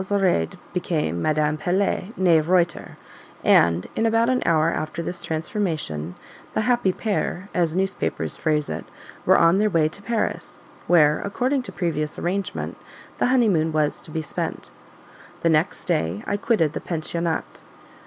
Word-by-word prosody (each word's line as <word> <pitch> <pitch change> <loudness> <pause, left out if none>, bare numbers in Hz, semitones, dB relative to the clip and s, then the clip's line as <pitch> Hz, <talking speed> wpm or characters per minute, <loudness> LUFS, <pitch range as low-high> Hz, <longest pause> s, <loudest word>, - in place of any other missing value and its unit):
Zoraide 190 - +1 0.2
became 155 - -1
Madame 155 - +1
Pelet, 190 +3 0
NEE 175 -4 +5
Reuter; 170 0 0 0.5
and, 85 +1 +4
in 225 - +2
about 225 +1 +3
an 255 -1 +2
hour 160 0 +3
after 155 +2 -3
this 175 +1 -5
transformation, 155 - -3 0.4
"the - - +2
happy 240 -4 +2
pair," 200 -2 -2
as 170 -2 +1
newspapers 190 +1 -1
phrase 150 -2 0
it, - - -4 0.4
were - - +7
on 170 +3 +5
their 215 0 +3
way 165 -5 +3
to 200 - -10
Paris; 225 +2 -3 0.2
where, 150 -3 +5
according 255 +7 0
to 250 - -9
previous 155 -4 -2
arrangement, 195 +3 -3 0.4
the - - +3
honeymoon 210 -11 +3
was 155 -1 0
to - - -12
be 160 0 -3
spent. 150 - -5 0.7
The 165 - +3
next 160 +4 +1
day 100 - -1
I 205 - -1
quitted 200 -7 +1
the - - -4
pensionnat. 170 0 -3
170 Hz, 150 wpm, -23 LUFS, 155-200 Hz, 0.7 s, were